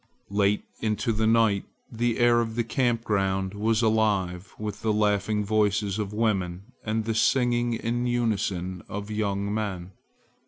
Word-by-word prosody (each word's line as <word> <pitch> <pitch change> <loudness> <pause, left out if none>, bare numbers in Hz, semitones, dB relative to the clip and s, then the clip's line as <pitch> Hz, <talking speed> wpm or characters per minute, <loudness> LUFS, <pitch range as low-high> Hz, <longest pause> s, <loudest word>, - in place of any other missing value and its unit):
Late 100 0 +2 0.2
into 110 +1 0
the 110 +1 +1
night 110 -3 +3 0.3
the 120 0 0
air 120 0 +4
of 115 -1 -3
the 120 - +1
camp 115 0 0
ground 95 -2 0
was 110 +2 +1
alive 100 -5 +1
with 105 -1 -5
the 110 - +1
laughing 105 0 +1
voices 105 -1 +1
of 105 -2 -2
women 100 -2 -1
and 110 0 -1
the 115 - 0
singing 120 +1 +2
in 120 +2 -1
unison 100 -7 -1
of 105 +1 -5
young 100 -1 -1
men. 95 -4 -3
105 Hz, 150 wpm, -26 LUFS, 100-115 Hz, 0.3 s, air